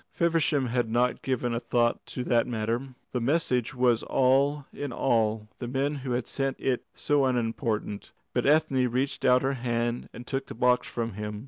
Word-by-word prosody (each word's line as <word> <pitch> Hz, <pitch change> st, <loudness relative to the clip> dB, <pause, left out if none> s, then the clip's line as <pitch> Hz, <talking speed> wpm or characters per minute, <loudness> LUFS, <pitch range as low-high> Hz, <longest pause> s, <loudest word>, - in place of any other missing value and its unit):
Feversham 160 Hz, -5 st, +1 dB
had 120 Hz, -1 st, 0 dB
not 120 Hz, +2 st, +1 dB
given 125 Hz, -2 st, -1 dB
a 115 Hz, -, 0 dB
thought 120 Hz, 0 st, +1 dB
to 125 Hz, -, -4 dB
that 120 Hz, -2 st, +2 dB
matter. 120 Hz, +3 st, -2 dB, 0.2 s
The 125 Hz, -, -1 dB
message 130 Hz, -3 st, +1 dB
was 125 Hz, -2 st, +3 dB
all 135 Hz, +2 st, +2 dB
in 145 Hz, -2 st, -4 dB
all, 110 Hz, -3 st, +1 dB
the 120 Hz, -, -4 dB
men 135 Hz, +4 st, 0 dB
who 130 Hz, -2 st, -3 dB
had 120 Hz, -1 st, -1 dB
sent 135 Hz, -1 st, -2 dB
it 130 Hz, -2 st, 0 dB
so 145 Hz, -1 st, +2 dB
unimportant. 115 Hz, -4 st, -1 dB, 0.2 s
But -, -, +1 dB
Ethne 145 Hz, -4 st, +3 dB
reached 130 Hz, +3 st, -1 dB
out 125 Hz, 0 st, +5 dB
her 135 Hz, +1 st, +1 dB
hand 120 Hz, -1 st, -2 dB
and 120 Hz, -, -10 dB
took 135 Hz, +1 st, -3 dB
the -, -, -8 dB
box 125 Hz, +1 st, +2 dB
from 115 Hz, -2 st, -3 dB
him. 105 Hz, +1 st, -5 dB
125 Hz, 185 wpm, -27 LUFS, 115-135 Hz, 0.2 s, out